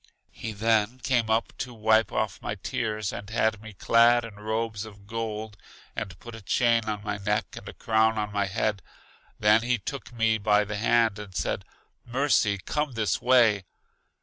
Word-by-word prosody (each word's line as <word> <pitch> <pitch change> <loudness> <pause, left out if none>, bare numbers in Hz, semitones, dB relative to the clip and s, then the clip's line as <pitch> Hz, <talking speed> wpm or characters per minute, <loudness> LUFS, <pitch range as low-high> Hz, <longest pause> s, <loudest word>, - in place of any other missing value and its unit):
He 110 - -6
then 110 +2 +1
came 120 -4 +1
up 110 +1 0
to 125 -2 -5
wipe 110 0 +3
off 110 -2 -2
my 105 - -3
tears 105 +1 -3
and 100 - -7
had 110 -1 0
me 110 -1 -10
clad 115 +4 +4
in 115 - -9
robes 110 0 -2
of 100 -2 -12
gold, 110 -1 -5 0.4
and 90 -2 -5
put 120 - -10
a 115 - -9
chain 115 +4 +2
on 105 -1 -3
my 105 -1 -3
neck, 100 - -1
and - - -8
a - - -9
crown 110 0 +2
on 105 -1 -2
my 100 -1 0
head. 100 +1 -1 0.6
Then 105 +1 +5
he 120 +1 +1
took 130 +7 -7
me 115 -2 +1
by 105 0 +3
the 105 0 -4
hand 115 -1 +2
and 100 -3 -9
said, - - -2 0.4
Mercy, 120 -5 +2
come 150 +7 -2
this 110 -4 0
way. 115 -6 +4
110 Hz, 180 wpm, -27 LUFS, 105-115 Hz, 0.6 s, Then